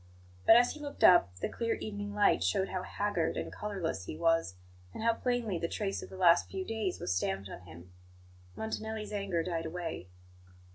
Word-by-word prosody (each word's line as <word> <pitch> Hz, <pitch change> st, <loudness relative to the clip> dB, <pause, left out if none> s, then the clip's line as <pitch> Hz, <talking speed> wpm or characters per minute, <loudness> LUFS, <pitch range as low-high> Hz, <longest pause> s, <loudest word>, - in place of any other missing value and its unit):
But, -, -, +10 dB
as 245 Hz, +1 st, +5 dB
he 305 Hz, -, -9 dB
looked 290 Hz, -1 st, -6 dB
up, 135 Hz, -, +6 dB
the -, -, 0 dB
clear 230 Hz, -1 st, -1 dB
evening 205 Hz, -1 st, -5 dB
light 205 Hz, -, +4 dB
showed 95 Hz, -, +1 dB
how 185 Hz, -, -2 dB
haggard 200 Hz, -3 st, -1 dB
and -, -, -4 dB
colourless 185 Hz, -, -3 dB
he 155 Hz, -, -6 dB
was, 165 Hz, -, +2 dB, 0.4 s
and -, -, -5 dB
how 230 Hz, 0 st, +4 dB
plainly 230 Hz, -6 st, -1 dB
the 170 Hz, -, -1 dB
trace 195 Hz, +2 st, -3 dB
of -, -, -9 dB
the 190 Hz, -, -10 dB
last 175 Hz, -2 st, +5 dB
few 380 Hz, -1 st, -4 dB
days 220 Hz, -, -2 dB
was -, -, -1 dB
stamped 95 Hz, +1 st, -2 dB
on -, -, -8 dB
him. 85 Hz, +3 st, -13 dB, 0.6 s
Montanelli's 220 Hz, -1 st, -4 dB
anger 195 Hz, -5 st, -1 dB
died 165 Hz, -1 st, -2 dB
away. 165 Hz, -, -5 dB
190 Hz, 190 wpm, -32 LUFS, 165-220 Hz, 0.6 s, But